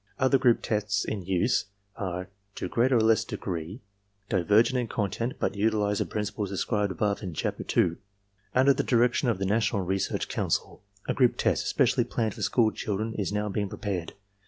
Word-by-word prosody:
Other 130 0 +3
group 120 -3 +3
tests 105 -2 0
in 100 -4 -4
use 95 +7 +1 0.3
are 90 -2 -4 0.3
to - - -3
greater 125 +2 +2
or - - +3
less 110 0 +4
degree 90 +5 -5 0.5
divergent 110 +6 +3
in 120 - -2
content 115 +4 -2
but - - 0
utilize 105 0 +1
the - - 0
principles 105 -1 -3
described 100 +1 -1
above 100 +3 -1
in 90 -6 -6
Chapter - - -2 0.2
II. 85 -1 +2 0.6
Under 135 +2 +5
the - - 0
direction 120 +1 +2
of 115 - +1
the 95 - -2
National 105 -1 +1
Research 95 +2 -1
Council, - - -2 0.3
a - - +1
group 125 -3 +3
test - - +1
especially 125 0 +2
planned 110 -3 -2
for 110 - -10
school 110 +2 +3
children 110 +2 -3
is 100 -3 -2
now 105 0 -1
being 100 0 -2
prepared. 95 -7 -4
105 Hz, 180 wpm, -27 LUFS, 95-115 Hz, 0.6 s, Under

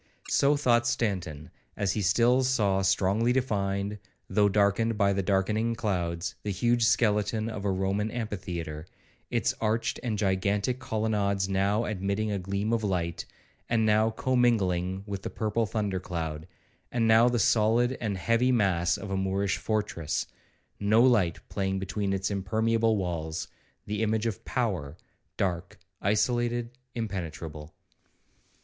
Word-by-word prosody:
So 145 +1 +3
thought 120 -4 +3
Stanton, 90 -9 -2 0.3
as 100 -3 +1
he 105 - -1
still 120 +7 +3
saw 105 -7 +2
strongly 95 +4 +2
defined, 100 -5 -1 0.3
though 105 -1 +3
darkened 105 +3 +2
by 100 -1 +3
the 100 - 0
darkening 105 +4 +1
clouds, 90 -3 -2
the 105 - -4
huge 120 +5 +2
skeleton 105 0 +2
of 105 -2 -6
a 100 - +2
Roman 95 +3 0
amphitheatre, 90 -9 -5 0.4
its - - +1
arched 110 +1 0
and 115 -4 -2
gigantic 100 +4 0
colonnades 105 -4 0
now 100 +4 +1
admitting 100 +1 -1
a 100 - -1
gleam 100 +4 -2
of 115 -1 0
light, 85 -4 -2 0.4
and 115 -2 +2
now 110 +1 +4
commingling 100 -7 +1
with 100 -2 -5
the - - -4
purple 110 +1 -1
thunder 100 -2 -1
cloud; 80 -3 -5 0.4
and 115 -2 +1
now 115 +2 +6
the 120 - 0
solid 115 +4 +3
and 105 -4 -1
heavy 115 +7 +2
mass 95 -7 +2
of 100 - -7
a - - 0
Moorish 95 +1 0
fortress, 105 -8 -2 0.5
no 110 +3 +4
light 105 -10 +3
playing 95 -1 -2
between 100 +1 -2
its 95 +1 -1
impermeable 110 +3 +1
walls,—the 85 +4 -5
image 110 0 +1
of 110 -5 -3
power, 90 - -2 0.4
dark, 90 -3 -2 0.2
isolated, 120 +3 +1 0.2
impenetrable. 80 -8 -5
105 Hz, 135 wpm, -28 LUFS, 95-115 Hz, 0.5 s, now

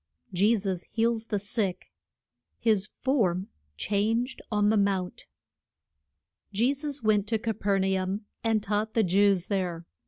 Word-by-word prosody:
JESUS 195 -1 +2
HEALS 230 0 0
THE 210 - 0
SICK. 200 -2 -2 0.7
HIS 210 -3 +2
FORM 200 -9 +1 0.3
CHANGED 225 - 0
ON 210 0 +3
THE - - +3
MOUNT. 195 -3 -1 1.2
JE 235 +7 +2
SUS 285 -1 -4
went 210 -2 +2
to 225 +1 +1
Ca 225 +1 -2
per 200 -1 0
na 190 0 +1
um 190 +3 -2 0.2
and 225 -2 +1
taught 215 +2 -1
the 225 - +4
Jews 195 0 +3
there. 180 -4 -2
205 Hz, 135 wpm, -28 LUFS, 190-225 Hz, 1.2 s, the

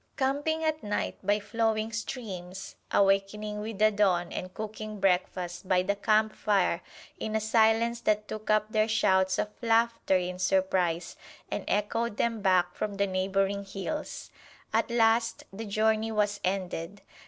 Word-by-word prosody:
Camping 290 +4 0
at 310 -1 0
night 205 0 -2
by 205 +2 +2
flowing 220 +1 0
streams, 195 -5 -6
awakening 200 +2 +1
with 215 0 -5
the 215 +1 +5
dawn 185 -4 +2
and 185 0 -5
cooking 215 +1 -6
breakfast 180 -1 0
by 180 -1 +4
the 200 +2 0
campfire 210 -4 +2 0.4
in 220 0 -3
a - - +3
silence 225 +1 +3
that 210 -2 +1
took 215 0 -7
up 215 0 +2
their 215 0 +2
shouts 190 -4 +2
of 210 - -1
laughter 230 -4 +2
in 180 0 -3
surprise, 185 -2 +1 0.4
and - - -2
echoed 225 +2 0
them 230 -2 0
back 180 -2 +3
from 210 -1 -3
the 200 0 +1
neighboring 195 +1 0
hills! 195 +10 -5 0.4
At - - +2
last 230 0 +2
the 225 +3 -6
journey 220 +2 +1
was 205 -1 0
ended. 185 0 -3
210 Hz, 145 wpm, -29 LUFS, 190-220 Hz, 0.4 s, the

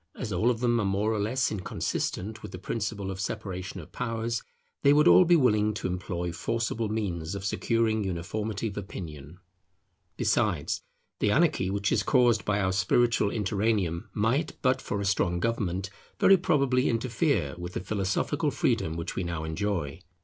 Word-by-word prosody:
As 110 -6 -4
all 100 +7 +2
of 120 -2 -1
them 120 -1 +2
are - - +1
more 100 +3 +1
or 110 - -1
less 125 +5 0
inconsistent 105 +1 -3
with 105 - -8
the - - -6
principle 100 0 -3
of 95 - -6
separation 95 -2 -4
of 80 - -11
powers, 115 -1 -2 0.4
they 140 - +6
would 150 +3 +5
all 185 - +8
be 175 +1 +5
willing 105 -7 +3
to - - -5
employ 90 -1 -2
forcible 115 +3 -2
means 95 -5 -2
of 100 0 -5
securing 110 +1 +1
uniformity 100 +4 -3
of 100 - -10
opinion. 80 -6 -7 0.8
Besides, - - +1 0.4
the - - +2
anarchy 145 - +2
which 100 +1 0
is 110 - +3
caused 120 -2 +3
by 105 -1 +1
our 95 -2 +1
spiritual 105 +3 +2
interregnum, 100 -4 0
might, 120 +9 0
but 130 0 +2
for 100 - -3
a - - -2
strong 90 -3 +1
government, 95 -3 -1 0.3
very 195 - +7
probably 135 -7 +2
interfere 115 - 0
with 90 0 -6
the - - -2
philosophical 100 -1 0
freedom 80 +1 0
which 85 - -4
we 95 - -1
now 85 -2 -3
enjoy. 80 -2 -2
105 Hz, 170 wpm, -28 LUFS, 95-115 Hz, 0.8 s, all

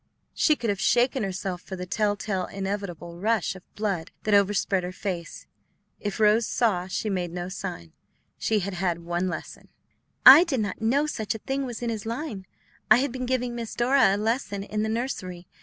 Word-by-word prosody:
She 305 - +3
could 235 -6 -1
have 200 0 -4
shaken 245 +2 +3
herself 190 -2 -3
for 190 - -7
the 180 0 -5
telltale, 205 -1 -1
inevitable 190 -4 -5
rush 215 -2 0
of 185 - -11
blood 195 -5 -2
that 215 - 0
overspread 200 -2 +3
her 180 - -4
face. 185 -3 -5 0.5
If 205 +1 -4
Rose 215 +2 +4
saw, 190 -7 +1
she 190 +3 -3
made 180 -4 -1
no 175 +1 -4
sign; 180 - -6 0.5
she 215 -2 +1
had 195 +1 -3
had 175 -2 -1
one 175 +2 -1
lesson. 180 - -6 0.6
"I 280 +6 +12
did 295 -8 -1
not 205 0 -4
know 265 +7 +2
such 220 -8 -3
a - - -3
thing 270 +4 -3
was 240 -1 -6
in 235 - -1
his 220 -1 -5
line. 230 - -5 0.4
I 215 - +9
had 265 +1 0
been 255 0 -4
giving 250 -1 0
Miss 235 -2 -5
Dora 240 -5 +4
a - - -2
lesson 210 -2 -1
in 210 +1 -3
the 220 - -1
nursery. 190 -7 -4
205 Hz, 190 wpm, -26 LUFS, 185-235 Hz, 0.6 s, I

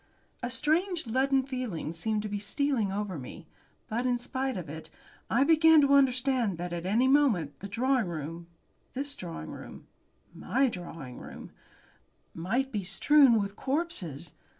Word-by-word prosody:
A 245 - -2
strange 320 +6 0
leaden 265 +3 +2
feeling 250 - -4
seemed 210 +5 -2
to - - -3
be 205 0 -3
stealing 230 -1 0
over 195 -4 -3
me, 150 +6 -9 0.4
but, 240 +3 -1
in 245 -1 +2
spite 260 0 -3
of 175 -3 -6
it, 160 +2 -8 0.4
I 245 +4 +3
began 320 +1 +6
to 280 0 +4
understand 255 -6 +3
that 175 0 -4
at 175 +1 -4
any 230 +7 +3
moment 250 - +2
the 200 - -6
drawing 245 +1 +1
room, 165 +1 -6 0.5
this 285 +2 -3
drawing 170 -2 -7
room, - - -10 0.5
my 270 0 +1
drawing 165 - -8
room, - - -10 0.8
might 235 +11 -1
be 205 -3 -2
strewed 240 +6 +5
with 200 0 -3
corpses. 185 - -3
235 Hz, 150 wpm, -29 LUFS, 180-270 Hz, 0.8 s, began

